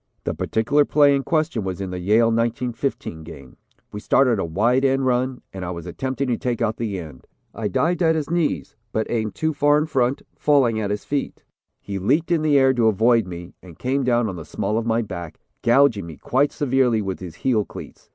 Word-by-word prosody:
The - - -2
particular 140 +7 +1
play 145 -1 +4
in 140 - 0
question 155 - 0
was 95 -1 -4
in 95 -2 -4
the 90 - -4
Yale 110 +5 +3
1915 115 - -2
game. 75 -5 -12 0.3
We 105 - -6
started 120 0 +3
a - - -1
wide 115 +10 +1
end 135 0 +2
run, 125 0 0
and 95 -1 -6
I 90 - -4
was 85 -2 -6
attempting 130 +9 -3
to 120 - +1
take 125 -4 -2
out 110 -2 -1
the 110 -4 -3
end. 80 -7 -10 0.3
I 110 -2 -3
dived 165 - 0
at 160 -1 +3
his 155 -3 -2
knees 170 -2 -1 0.2
but 110 - -1
aimed 110 -4 -1
too 160 0 -1
far 145 +1 +3
in 150 - +1
front, 130 -4 0
falling 130 -7 +2
at 105 -2 -2
his 105 0 -3
feet. 145 -1 -3 0.4
He 100 -1 -5
leaped 145 - +1
in 165 -2 +3
the 150 -2 +3
air 135 -1 +5
to 120 -3 +2
avoid 115 0 +3
me, 85 -1 -8
and 90 -3 -14
came 135 +2 -1
down 120 -2 +2
on 95 -3 -5
the 80 - -7
small 105 +7 -2
of 115 - -4
my 115 +1 +1
back, 85 -6 -7 0.2
gouging 120 -6 +3
me 80 -4 -9
quite 140 +3 +1
severely 130 -6 +1
with 95 -1 -4
his 90 -4 -8
heel 115 -1 +1
cleats. - - -12
115 Hz, 220 wpm, -22 LUFS, 100-135 Hz, 0.4 s, air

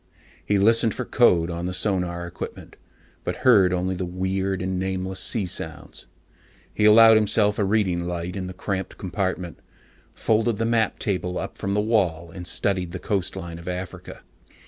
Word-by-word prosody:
He 105 - +1
listened 115 +2 +3
for 125 - -4
code 90 -10 +3
on 85 +1 -4
the 90 - -2
sonar 90 -3 -1
equipment, 85 - -8 0.5
but 90 - -3
heard 100 -8 +6
only 90 +1 -1
the 95 0 -4
weird 95 +1 -2
and 95 0 -2
nameless 95 0 -3
sea 105 0 0
sounds. 90 - -4 0.7
He 105 - +1
allowed 110 +1 +8
himself 105 -1 +2
a - - +2
reading 95 -4 +1
light 90 +1 -4
in 95 -2 -4
the 90 - -8
cramped 95 -1 -4
compartment, 90 -2 -3 0.6
folded 115 0 +1
the 115 - -1
map 115 -2 +1
table 90 -2 -2
up - - -5
from 100 +1 -3
the 105 - +2
wall, 90 -7 0
and 90 0 -7
studied 90 -2 0
the - - -3
coastline 90 -4 -3
of 85 - -12
Africa. 90 +1 -6
95 Hz, 170 wpm, -24 LUFS, 90-105 Hz, 0.7 s, allowed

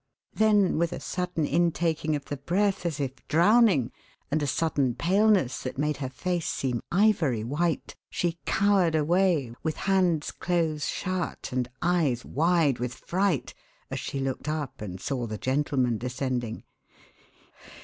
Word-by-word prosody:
Then 210 -6 +3
with 170 0 +1
a - - -5
sudden 180 -4 -2
intaking 165 -1 +1
of 145 - -5
the 145 - -5
breath, 190 +6 0
as 160 -3 -3
if 135 -2 -2
drowning, 185 - +4 0.4
and 155 +1 +1
a 145 - 0
sudden 140 -4 0
paleness 195 - +2
that 130 - -5
made 150 0 0
her 135 -2 -4
face 175 +5 -2
seem 125 -3 -1
ivory 175 - +2
white, 155 +7 -1
she 170 -1 -2
cowered 195 -5 +3
away, 160 -5 +2
with 160 -1 -2
hands 180 -5 +2
close 165 -4 -1
shut, 185 -1 -3
and 125 -1 -1
eyes 160 -9 +1
wide 160 -3 +2
with 125 0 -3
fright 185 -6 -1 0.4
as - - -2
she 140 - -4
looked 135 +2 -3
up 150 -7 -4
and 95 -3 -6
saw 125 +2 -2
the 110 -1 -4
gentlemen 130 -1 0
descending. 125 -2 -3
155 Hz, 145 wpm, -27 LUFS, 130-180 Hz, 0.4 s, drowning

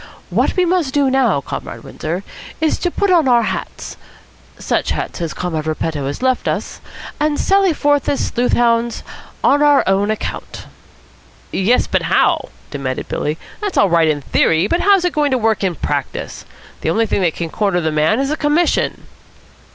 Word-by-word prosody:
What - - +1
we 365 - +4
must 340 -6 0
do 280 -2 +3
now, 245 - +2
Comrade - - -7
Windsor, 170 +5 -5 0.4
is 315 0 +1
put 375 +2 0
on 335 -6 +4
our 240 -2 +4
hats, - - -5 0.6
such - - -1
hats - - -3
as 165 -2 -2
Comrade 160 -3 -3
Repetto 155 -2 -2
has 145 - -5
left 260 -1 +1
us, - - -3 0.4
and 300 0 0
sally 390 -1 +3
forth 290 -2 +1
as 280 - 0
sleuth 245 0 -1
hounds 235 -1 +1 0.4
on 290 - +4
our 290 -1 +5
own 195 +2 +1
account." 215 - -5 0.9
"Yes, 210 +6 +2
but - - 0
how?" - - +1 0.2
demanded 135 -3 -4
Billy. 150 +2 -2 0.2
"That's 410 -2 -3
all 200 -3 +4
right 165 -1 +4
in 150 -2 0
theory, 160 +5 +2
but 340 - 0
how's 395 -2 +4
it 360 - 0
going 295 -1 +1
to 260 - +1
work 220 -3 0
in 185 -3 0
practice? - - -4 0.4
The - - -1
only 225 +7 +2
thing 200 - -1
that 170 -4 +1
can 165 -2 -4
corner 200 -5 0
the 160 -2 -1
man 155 +9 +2
is 275 +1 0
a - - +1
commission." 300 +4 +1
230 Hz, 180 wpm, -18 LUFS, -, 0.9 s, our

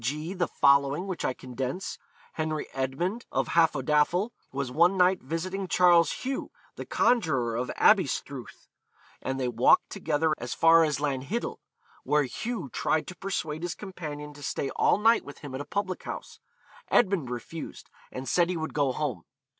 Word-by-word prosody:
g., 150 +8 -2
the 180 -3 0
following, 140 +4 +3
which 185 -4 -4
I 130 - 0
condense: 130 +8 -5 0.3
Henry 155 -1 -2
Edmund, 155 - -2
of - - 0
Hafodafel, 160 - +2 0.2
was 135 -2 -3
one 175 +7 +4
night 185 0 +4
visiting 185 +7 -3
Charles 175 -3 +5
Hugh, 265 +1 -3 0.3
the - - -7
conjuror 155 - +2
of 125 +2 -2
Aberystruth, 140 - +1 0.5
and 135 0 -3
they 130 - 0
walked 120 0 +4
together 160 -4 0
as 120 +1 -4
far 165 0 +6
as 150 -2 +1
Lanhiddel, 145 - -2 0.5
where 150 0 +2
Hugh 220 - -4
tried 155 - 0
to 185 - -8
persuade 160 -6 -3
his 175 0 -3
companion 150 -7 -7
to 145 - -13
stay 135 0 -2
all - - +3
night 225 +3 +4
with 145 - -10
him 145 -3 -8
at 130 - -4
a - - -6
public 200 -3 -3
house. - - -7 0.5
Edmund 185 - +2
refused, 125 +7 -7 0.2
and 130 +1 -6
said 175 -1 +3
he 180 - -1
would 160 0 -4
go 140 -3 +2
home. 150 -2 -3
155 Hz, 160 wpm, -28 LUFS, 135-180 Hz, 0.5 s, far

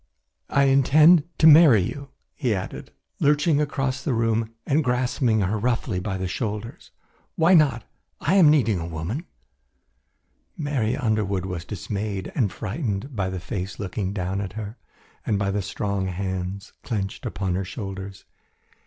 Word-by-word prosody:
"I 140 - +3
intend 145 +4 +5
to 155 - +3
marry 150 - +8
you," 140 +8 -6 0.2
he 125 -7 0
added, 95 - -6 0.3
lurching 150 +1 +3
across 135 -2 -1
the 135 -6 0
room 115 0 0
and 150 +3 +2
grasping 125 -3 +1
her 100 +3 0
roughly 115 -3 -1
by 95 +1 -3
the 95 0 -3
shoulders. 105 +3 -5 0.5
"Why 170 +3 +4
not? 140 -9 +4 0.4
I 160 - 0
am 185 -6 +7
needing 120 - +3
a 80 - -4
woman." 85 - -5 1.3
Mary 135 -7 -1
Underwood 105 -7 0
was 90 -3 -5
dismayed 100 0 -4
and 110 -8 +1
frightened 110 - -4
by 95 -3 -1
the 95 -1 -4
face 95 0 -5
looking 95 -1 -3
down 95 0 -2
at 95 -2 -5
her, 110 +2 -7 0.4
and 105 - 0
by 100 0 0
the 100 +1 -1
strong 100 0 -2
hands 95 +1 -4
clenched 100 -5 -4
upon 95 -1 -2
her 95 +2 -1
shoulders. 95 -1 -7
110 Hz, 150 wpm, -24 LUFS, 95-135 Hz, 1.3 s, marry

